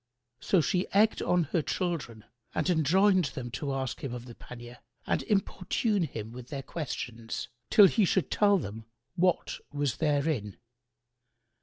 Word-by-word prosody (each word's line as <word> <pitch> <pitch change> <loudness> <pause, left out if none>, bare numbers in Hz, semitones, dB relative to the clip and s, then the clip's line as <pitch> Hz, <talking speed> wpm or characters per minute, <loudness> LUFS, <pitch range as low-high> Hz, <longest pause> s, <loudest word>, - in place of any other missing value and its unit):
So 185 - +3
she 180 +5 0
egged 215 +2 +4
on 175 -1 +2
her 170 - +3
children 150 - -3 0.3
and - - 0
enjoined 185 +4 +4
them 125 -3 -5
to 140 +3 -3
ask 135 -2 -3
him 130 -3 -3
of 120 0 -8
the 120 - -10
pannier 120 +1 -11 0.3
and - - 0
importune 200 +1 0
him 110 -6 -6
with 125 0 -9
their 140 -1 -5
questions, 120 -9 -5 0.2
till 205 - +8
he 215 +3 +3
should 190 0 +1
tell 205 -1 +4
them 110 - -6 0.3
what 180 0 +1
was 145 -3 -1
therein. 145 - 0
150 Hz, 150 wpm, -29 LUFS, 120-185 Hz, 0.3 s, till